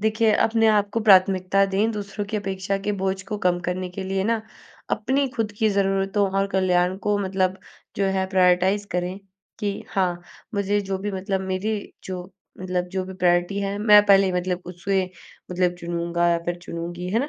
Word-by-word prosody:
देखिए, 220 +1 +2
अपने 225 +1 +3
आप 205 -1 +3
को 230 - +1
प्राथमिकता 195 -1 +4
दें, 200 +4 +1
दूसरों 205 0 -5
की 215 - -3
अपेक्षा 195 -1 -2
के 205 +1 -2
बोझ 190 0 -1
को 210 - -3
कम 180 -2 +1
करने 180 0 -2
के 190 +1 -6
लिए 190 0 -1
ना, 225 0 0 0.5
अपनी 265 +5 +1
खुद 215 -2 -1
की 220 - +3
ज़रूरतों 195 0 +1
और 195 - +2
कल्याण 185 -1 +2
को 205 -1 +2
मतलब 190 -1 0 0.4
जो 195 0 +1
है 190 - 0
प्रायोरिटाइज़ 190 +2 +3
करें। 180 +2 -2 0.4
कि 205 -1 0 0.2
हाँ, 180 -2 0 0.3
मुझे 200 +1 +1
जो 195 0 -3
भी 205 +2 -3
मतलब 190 0 -2
मेरी 190 +4 -1 0.3
जो 185 -1 -5 0.4
मतलब 180 -1 -1
जो 190 -1 -1
भी 190 - -8
प्रायोरिटी 175 +1 +1
है, 200 0 -2
मैं 210 -1 +7
पहले 195 -1 +6
ही 185 - -1
मतलब 180 0 -2
उसे 185 +2 -1 0.5
मतलब 180 0 +1
चुनूँगा 170 0 0
या 170 0 +2
फिर 175 0 -2
चुनूँगी, 175 +1 -5
है 225 - +2
ना? 285 - -2
190 Hz, 185 wpm, -23 LUFS, 180-205 Hz, 0.5 s, मैं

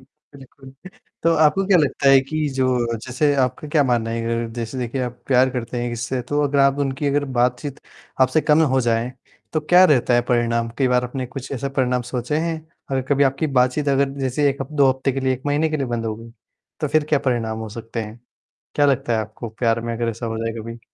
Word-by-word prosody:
बिल्कुल। 135 -1 -17 0.5
तो 165 0 +4
आपको 160 +5 +3
क्या 190 -3 +5
लगता 140 -1 +2
है 135 -1 +7
कि 155 +3 -2
जो 130 -1 +2 0.4
जैसे 145 +3 +1
आपका 130 +4 -5
क्या 150 -1 +3
मानना 120 -3 0
है 115 0 -2
अगर 115 0 -1
जैसे 120 +2 -5
देखिए 125 +2 -3
आप 125 0 -5
प्यार 130 0 +4
करते 120 -1 -4
हैं 120 - -2
इससे 120 +2 -3
तो 145 0 +1
अगर 145 0 +1
आप 140 +1 +4
उनकी 140 +1 -1
अगर 145 +1 +1
बातचीत 125 +3 0 0.4
आपसे 130 +4 +4
कम 150 +1 +3
हो 130 - +3
जाए। 120 +1 0 0.4
तो 155 - +1
क्या 180 +4 +6
रहता 130 -6 +3
है 120 - +4
परिणाम? 115 -1 +1
कई 130 -2 +3
बार 125 0 +2
आपने 125 +1 -4
कुछ 130 +1 -8
ऐसा 140 +1 -3
परिणाम 125 -2 0
सोचें 125 +5 -2
हैं 165 -1 -2 0.3
और 135 -1 0
कभी 140 0 +3
आपकी 135 +4 0
बातचीत 130 +4 +2
अगर 140 0 +2
जैसे 135 +2 +1
1 140 0 -7
हफ 135 - -9
2 140 -2 +4
हफ्ते 130 +1 -1
के 135 - -3
लिए 130 0 +1
1 130 +1 -5
महीने 145 +2 +1
के 155 - 0
लिए 135 -3 -2
बंद 115 -1 -3
हो 110 - -2
गई। 115 +1 -12 0.5
तो - - 0
फिर 155 -1 +2
क्या 150 - +3
परिणाम 120 -5 -1
हो 110 -1 -5
सकते 115 +1 -6
हैं, 110 +2 -10 0.6
क्या 145 - +4
लगता 130 -4 +1
है 110 - +1
आपको 110 +2 -6
प्यार 115 0 0
में 115 0 -3
अगर 115 0 -1
ऐसा 115 +2 -5
हो 115 -1 -3
जाए 115 0 -2
कभी? 115 +1 -8
130 Hz, 230 wpm, -21 LUFS, 120-145 Hz, 0.6 s, है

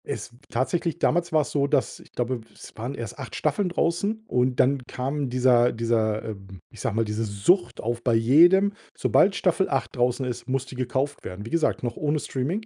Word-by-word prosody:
Es - - -6
w - - -19
tatsächlich 160 +7 -1
damals 175 +1 +1
war's 155 -2 +1
so, 140 -1 +1
dass 135 - 0
w - - -14
ich - - -23
glaube, 125 0 -2
es - - -13
waren 120 +5 -5
erst 115 -5 -7
8 - - -7
Staffeln 170 +6 0
draußen 190 +6 -1
und 125 0 +1
dann 135 +2 +4
kam 135 +2 -3
dieser 125 -1 +4
dieser, 110 -2 0
ähm 95 -3 -8
ich - - -13
sage - - -1
mal, 115 0 +1
diese 105 +1 -2
Sucht 120 - +1
auf 120 +1 -2
bei 120 -3 +2
jedem: 175 - +5 0.2
Sobald 195 0 +3
Staffel 185 +1 +1
8 135 -1 -2
draußen 125 +1 +1
ist, 125 -1 -5
muss 135 0 -1
die 135 - -10
gekauft 130 +3 -2
werden. 95 +3 -7
Wie - - -7
gesagt, 170 -5 +1
noch 120 - -3
ohne 150 0 0
Streaming, 155 - -3
130 Hz, 210 wpm, -25 LUFS, 115-155 Hz, 0.2 s, jedem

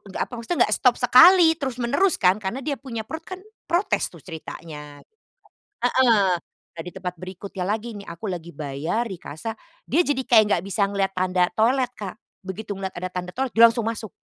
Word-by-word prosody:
enggak 190 - -6
apa, - - -33
maksudnya 235 +9 -3
enggak - - +1
stop - - +3
sekali, 345 -2 +7
terus 260 -3 -3
menerus 285 +10 +2
kan 185 0 +4
karena 200 +7 -3
dia 290 - -1
punya 230 -5 -6
perut 320 0 -6
kan 370 +1 -8 0.3
protes 350 +4 +1
tuh - - -13
ceritanya. 155 -3 -9
Heeh, 440 - -54 1.6
nah 165 - -5
di 180 - -8
tempat 180 -2 -5
berikutnya 185 +2 -7
lagi 220 +4 -3
nih 205 - -8
aku 170 +6 -8
lagi 170 -2 -5
bayar 150 +11 -3
di 195 - -5
kasa, 170 +7 -7 0.3
dia 325 +7 +3
jadi 280 -2 0
kayak 220 -3 +7
nggak 170 - -6
bisa 200 +1 +1
melihat 195 -1 0
tanda 180 -1 +2
toilet, 250 +3 +3
Kak. 195 -3 -6 0.3
Begitu 200 +2 -5
melihat 190 -1 -4
ada 185 - -3
tanda 180 0 -4
toilet 265 -1 -2
dia 230 - +8
langsung 230 -1 -3
masuk. 220 -3 -5
210 Hz, 195 wpm, -23 LUFS, 180-250 Hz, 1.6 s, dia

